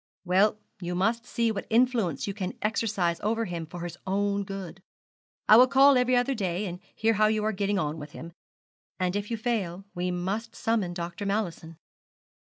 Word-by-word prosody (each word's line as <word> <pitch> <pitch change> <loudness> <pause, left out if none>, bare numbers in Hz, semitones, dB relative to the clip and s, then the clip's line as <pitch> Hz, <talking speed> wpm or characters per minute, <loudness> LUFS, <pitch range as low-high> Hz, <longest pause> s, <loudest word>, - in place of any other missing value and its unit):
'Well, 195 +4 +3 0.2
you 175 0 -3
must 230 +6 0
see 230 -1 +1
what 200 -2 -5
influence 230 - +2
you 200 - -3
can 190 -2 -4
exercise 205 -6 0
over 225 +2 0
him 170 -4 -5
for 175 +2 -8
his 175 0 -6
own 200 +1 0
good. 190 -2 -7 0.7
I 215 - +9
will 250 +2 +8
call 275 +2 +6
every 250 0 +3
other 245 +2 +2
day, 190 -3 -2
and 180 -2 -5 0.2
hear 225 +1 +2
how 215 0 +4
you 215 0 +1
are 215 - +1
getting 200 0 0
on 155 -3 -2
with 150 0 -9
him; 170 +1 -9 0.7
and 180 0 0
if 205 0 -2
you 230 - -2
fail, 195 -6 -2
we 180 0 -2
must 195 +6 -3
summon 210 -6 0
Dr. 175 +4 -4
Mallison.' 175 -6 -3
200 Hz, 190 wpm, -27 LUFS, 175-225 Hz, 0.7 s, I